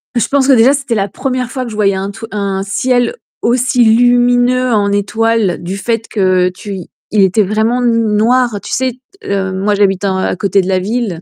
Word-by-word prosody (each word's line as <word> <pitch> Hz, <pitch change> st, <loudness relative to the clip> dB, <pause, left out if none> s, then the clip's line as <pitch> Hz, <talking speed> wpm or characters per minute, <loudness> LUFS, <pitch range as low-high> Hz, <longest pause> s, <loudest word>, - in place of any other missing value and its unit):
Et -, -, +2 dB
je -, -, 0 dB
pense 275 Hz, -1 st, +2 dB
que 275 Hz, -, +5 dB
déjà 250 Hz, +3 st, +5 dB
c'était 275 Hz, -4 st, -2 dB
la 200 Hz, -1 st, 0 dB
1re 255 Hz, +2 st, -3 dB
fois 260 Hz, -2 st, -3 dB
que 230 Hz, -, -7 dB
je -, -, -7 dB
voyais 200 Hz, -2 st, +1 dB
un 195 Hz, +1 st, -4 dB
tru 225 Hz, +2 st, -9 dB
un 200 Hz, -2 st, -2 dB
ciel 245 Hz, -, 0 dB, 0.3 s
aussi 245 Hz, +1 st, +2 dB
lumineux 245 Hz, +2 st, +3 dB
en 205 Hz, -2 st, +1 dB
étoile 215 Hz, -1 st, 0 dB
du 185 Hz, +3 st, -4 dB
fait 225 Hz, +2 st, -2 dB
que 185 Hz, -3 st, +1 dB
tu 190 Hz, +1 st, -7 dB, 0.3 s
il 205 Hz, -, +4 dB
était 190 Hz, +3 st, +3 dB
vraiment 220 Hz, +5 st, 0 dB
n 230 Hz, -3 st, +1 dB
noir. 235 Hz, 0 st, +2 dB
Tu -, -, -9 dB
sais, 260 Hz, 0 st, 0 dB, 0.3 s
t -, -, -11 dB
heu, 190 Hz, -1 st, -1 dB
moi 200 Hz, +2 st, 0 dB
j'habite 195 Hz, -1 st, +1 dB
en 190 Hz, -1 st, 0 dB
à 190 Hz, -, -1 dB
côté 195 Hz, +1 st, +1 dB
de 185 Hz, -, -5 dB
la 185 Hz, -1 st, +1 dB
ville, 205 Hz, -4 st, -3 dB
220 Hz, 220 wpm, -14 LUFS, 195-245 Hz, 0.3 s, que